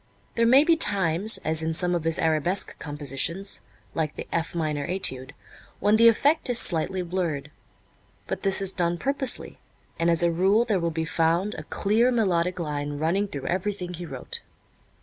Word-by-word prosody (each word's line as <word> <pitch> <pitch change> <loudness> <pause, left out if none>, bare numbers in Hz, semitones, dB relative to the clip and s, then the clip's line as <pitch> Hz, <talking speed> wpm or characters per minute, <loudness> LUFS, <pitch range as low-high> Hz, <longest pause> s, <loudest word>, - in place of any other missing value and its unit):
There 230 0 +2
may 265 +4 +7
be 330 +1 +4
times, 200 - +3
as 160 0 +1
in 160 0 -2
some 180 +1 +1
of 170 -2 -2
his 165 0 +1
arabesque 165 +4 0
compositions, 150 +6 -3 0.3
like 155 -2 -2
the - - -7
"F 165 +1 -2
Minor 150 -3 -2
Étude," 130 -8 0 0.5
when 210 +1 +3
the 230 +1 +6
effect 285 +6 +3
is 245 - +2
slightly 180 -1 -1
blurred. 165 -5 -3 0.7
But - - -4
this 195 0 +2
is 195 0 0
done 175 -1 0
purposely, 270 +3 -1 0.4
and 165 +1 +2
as 170 0 +2
a 170 - +3
rule 195 +7 +2
there 210 -5 0
will 170 -1 -1
be 160 0 -3
found 165 +5 +1
a - - -7
clear 225 +5 +1
melodic 180 -6 0
line 145 -2 -3
running 175 +7 0
through 140 -8 -7
everything 185 0 -3
he 175 0 -7
wrote. 135 -4 -5
175 Hz, 175 wpm, -25 LUFS, 160-205 Hz, 0.7 s, may